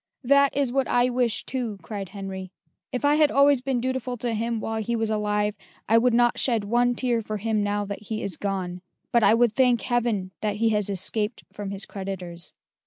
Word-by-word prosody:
"That 280 +1 +4
is 275 -3 +1
what 270 +1 +1
I 245 +1 +2
wish 245 -2 0
too," 240 -6 -3
cried 195 +1 -6
Henry. 190 -2 -7 0.4
"If 255 +3 -2
I 295 +1 +4
had 305 -1 +5
always 280 -2 +4
been 265 -1 -1
dutiful 255 0 -2
to 240 0 -2
him 230 +1 -1
while 220 0 -2
he 235 +2 -1
was 225 -1 -1
alive, 210 -1 0 0.3
I 225 +1 +5
would 245 0 +3
not 240 0 +3
shed 230 -5 +1
one 240 +3 +2
tear 240 -2 +1
for 215 0 -4
him 215 +1 0
now 205 0 0
that 200 +1 -6
he 215 +1 -4
is 195 -4 -2
gone 185 -1 -3 0.3
but 235 - +4
I 220 - +6
would 235 -2 +3
thank 250 -1 +3
Heaven 230 -6 0
that 210 -1 -1
he 225 +2 +2
has 210 -2 0
escaped 210 +3 -1
from 205 -1 -5
his 195 0 -3
creditors." 185 -3 -6
225 Hz, 210 wpm, -25 LUFS, 205-245 Hz, 0.4 s, I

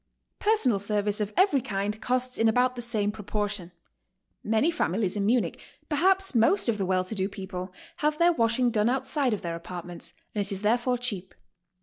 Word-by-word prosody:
^ - - -52
Personal 350 - +2
service 205 +1 -1
of 210 0 -2
every 370 -8 +4
kind 210 -2 -3
costs 255 0 0
in 225 0 +4
about 250 +2 +2
the 240 - -5
same 215 -3 +1
proportion. 205 -3 -4 0.7
Many 225 +10 +2
families 200 - -1
in 200 -1 0
Munich, 240 +1 +1 0.3
perhaps 380 +5 +3
most 240 - +3
of 220 -3 0
the 190 - -1
well 185 -1 +2
to 185 - -5
do 195 -2 -1
people, 190 -2 -6 0.3
have 300 0 0
their 345 +1 +4
washing 235 -1 +2
done 215 0 +2
outside 265 +1 0
of 210 -2 -2
their 170 -1 -3
apartments, 175 0 -8 0.2
and 205 - 0
it 200 - -4
is 195 +1 -4
therefore 240 +3 +2
cheap. 195 -7 -5
220 Hz, 190 wpm, -27 LUFS, 200-255 Hz, 0.7 s, every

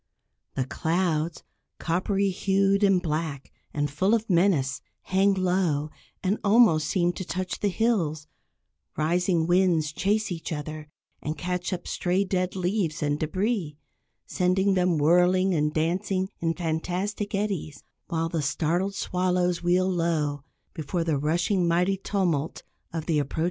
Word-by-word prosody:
The 130 - 0
clouds, 165 +2 -1 0.3
coppery 195 +3 0
hued 195 +2 +2
and 195 -2 +5
black, 155 -4 -3 0.2
and 145 0 -1
full 185 +10 +2
of 225 0 -2
menace, 170 -8 +2 0.2
hang 195 +1 +2
low, 180 -5 0 0.3
and 195 +3 0
almost 200 -8 +5
seem 175 -2 +1
to 185 - -5
touch 185 +1 -4
the 205 - +1
hills, 180 -8 0 0.7
rising 170 +1 +1
winds 175 -3 +2
chase 205 +5 0
each 165 -1 -5
other 155 0 -5 0.3
and 155 +1 -4
catch 180 +1 -3
up 180 -2 -4
stray 185 +2 0
dead 185 -1 -1
leaves 180 -4 -1
and 145 0 0
débris, 185 0 -1 0.5
sending 190 +2 +1
them 180 -3 +2
whirling 180 +5 +4
and 150 -2 +1
dancing 185 +4 -1
in 165 -1 0
fantastic 180 +5 -2
eddies; 195 -8 -3 0.2
while 165 -1 -1
the 165 -1 -2
startled 170 +6 0
swallows 180 -1 0
wheel 180 +2 +2
low 160 -6 0 0.3
before 165 +3 -2
the 160 -4 0
rushing, 175 +5 +1
mighty 180 +3 +2
tumult 175 -6 -1 0.3
of 160 -2 -4
the 160 -3 +1
approaching 140 -1 -3
storm. - - -3
175 Hz, 140 wpm, -26 LUFS, 155-190 Hz, 0.7 s, and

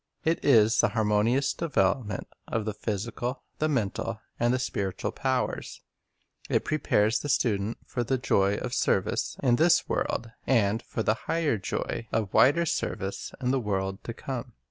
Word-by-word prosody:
It 165 +1 +1
is 115 -5 +5
the - - +3
harmonious 115 +5 +2
devel 165 -3 +2
opment 100 -3 -5 0.2
of 115 -2 -2
the 110 - -2
physical, 120 +5 -3 0.2
the 155 - +1
mental, 115 -3 -1 0.2
and 120 0 +3
the 130 - +2
spiritual 100 -7 -2
powers. - - -2 0.7
It - - +1
prepares 115 -7 +2
the 145 - -5
student 110 -4 +1
for 120 - -2
the 130 +3 0
joy 100 -4 +2
of - - -4
service - - 0
in 120 -3 +4
this 170 +4 +4
world, 115 - -1 0.2
and 110 -4 +3
for 115 - -4
the 110 - +3 0.2
higher 160 -9 +1
joy 115 +4 -3
of 105 -4 -1
wider 170 +6 +5
service 95 - -3
in 125 -1 0
the 135 - +2
world 95 -3 -2
to 115 - -4
come. 130 -2 -5
115 Hz, 165 wpm, -28 LUFS, 105-130 Hz, 0.7 s, is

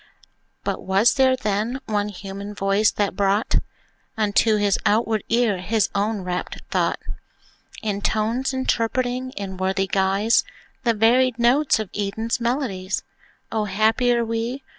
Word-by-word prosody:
But - - -2
was 195 +5 +3
there, 260 -1 +4
then, 220 +2 -1
one 210 -1 -1
human 200 +1 -7
voice 200 +2 +2
that 205 -3 -1
brought 200 +2 +1 0.6
Unto 215 +1 +3
his 205 -2 +2
outward 220 0 +1
ear 230 -5 +2
his 210 +4 0
own 205 +1 0
rapt 180 0 -4
thought, - - +1 0.9
In 205 -2 -2
tones, 225 +6 0
interpreting 255 0 -1
in 195 -2 -5
worthy 190 +1 0
guise 195 +4 +2 0.4
The 230 -1 +3
varied 245 +3 +3
notes 250 +5 +3
of 215 -3 -5
Eden's 220 +4 -2
melodies? 235 -6 -1 0.5
O, 215 -1 0
happier 225 +4 +2
we! 230 +4 -3
215 Hz, 130 wpm, -23 LUFS, 200-235 Hz, 0.9 s, there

